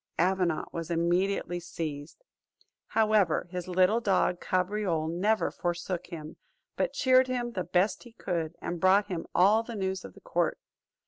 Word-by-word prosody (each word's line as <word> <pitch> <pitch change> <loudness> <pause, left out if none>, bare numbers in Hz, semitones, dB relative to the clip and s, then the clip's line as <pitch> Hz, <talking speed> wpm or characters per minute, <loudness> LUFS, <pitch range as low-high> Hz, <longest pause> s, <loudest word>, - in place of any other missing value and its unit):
Avenant 180 -2 +1
was 165 -1 -4
immediately 175 +1 0
seized. 160 - -6 0.6
However, 215 -6 +2
his 180 -1 -5
little 185 +5 +3
dog 190 -4 +1
Cabriole 185 -3 0
never 200 +7 +1
forsook 175 0 -3
him, 160 -3 -8 0.4
but - - -1
cheered 260 -1 +4
him 245 -1 -2
the 185 -6 -3
best 180 +3 +1
he 240 -2 -14
could, 170 -6 -3
and 175 - -3
brought 195 +2 +4
him 175 -3 -4
all 200 +5 +5
the 230 0 -7
news 190 -2 -2
of - - -11
the - - -15
court. - - 0
185 Hz, 150 wpm, -29 LUFS, 170-210 Hz, 0.6 s, all